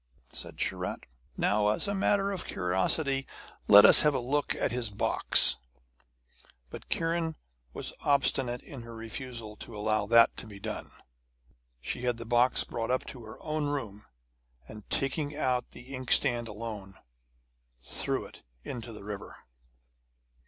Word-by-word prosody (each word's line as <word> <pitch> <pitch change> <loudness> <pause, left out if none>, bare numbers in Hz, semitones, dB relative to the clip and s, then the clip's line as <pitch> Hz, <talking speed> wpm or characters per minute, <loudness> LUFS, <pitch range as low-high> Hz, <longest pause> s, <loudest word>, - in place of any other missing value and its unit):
Said - - -5
Sharat: - - -3 0.3
'Now, 105 0 +1
as 105 - +2
a 200 - -1
matter 200 0 +1
of 195 - -4
curiosity, 135 - +1 0.4
let 100 0 +9
us - - +10
have 150 -2 +2
a - - +1
look 140 +4 -1
at - - -1
his 120 -2 -1
box.' 100 0 +4 1.1
But - - -10
Kiran 165 -1 -1 0.4
was - - -5
obstinate 135 -3 +1
in 135 -4 -10
her 115 0 -10
refusal 115 -1 -6
to 115 - -8
allow 105 0 0
that 115 +1 +5
to - - -7
be 100 -2 -11
done. - - -6 0.9
She - - -4
had 125 -2 -1
the 115 - -7
box 120 +2 +3
brought 115 -1 -5
up 130 +1 0
to 125 - -8
her 110 - -10
own 155 -1 -2
room; 115 -8 -5 0.6
and 105 -2 -12
taking 145 +2 0
out 125 -4 -1
the 130 +3 -11
inkstand 120 -2 +4
alone, 105 -3 -7 0.8
threw 60 - -1
it - - -13 0.2
into 120 -2 -7
the 105 -2 -11
river. 105 -1 -9
120 Hz, 145 wpm, -29 LUFS, 110-140 Hz, 1.1 s, us